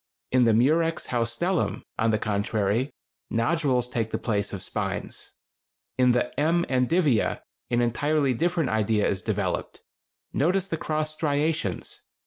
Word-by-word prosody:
In 125 -1 +4
the 115 - +4
Murex 160 +7 +2
haustellum, 125 +10 -1 0.2
on 115 - +3
the 110 - +2
contrary, 105 +4 0 0.4
nodules 125 0 +1
take 115 -2 -2
the - - -2
place 105 -3 -1
of 95 - -6
spines. - - -4 0.6
In 125 -1 +4
the 120 0 0
M. 170 +3 +2
endivia 130 - +2 0.3
an 120 0 +2
entirely 140 +3 +1
different 170 +1 0
idea 110 -1 +2
is 95 - -1
developed. 100 -3 -2 0.5
Notice 180 +6 +2
the 180 - -3
cross 155 0 -1
striations. 150 - -1
125 Hz, 130 wpm, -26 LUFS, 110-155 Hz, 0.6 s, In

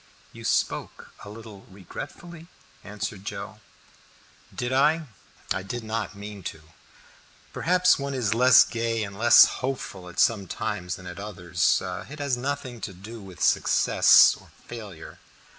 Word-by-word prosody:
"You - - -11
spoke - - -2
a 100 - -10
little 105 -2 -12
regretfully," 155 - -10 0.4
answered 105 -1 -6
Joe. - - -7 0.9
"Did 125 +1 -3
I? 155 +4 +3 0.5
I 95 - -3
did 115 +5 -6
not 110 -2 -4
mean 100 0 -9
to. 80 - -6 0.9
Perhaps 180 -1 +3
one 140 0 -4
is 115 -5 0
less 125 +1 +7
gay 115 -1 -2
and 100 -1 -7
less 120 +3 +8 0.2
hopeful 125 -8 -5
at 90 - -8
some 105 -5 +2
times 90 -1 -4
than 90 - -13
at 90 +1 -8
others. 90 -4 0
It 95 +11 -7
has 140 -3 -1
nothing 130 -2 -4
to 100 - -5
do 105 +5 -10
with 95 -2 -8
success - - +5
or - - -18 0.2
failure." 105 -9 -10
110 Hz, 140 wpm, -25 LUFS, 95-130 Hz, 0.9 s, less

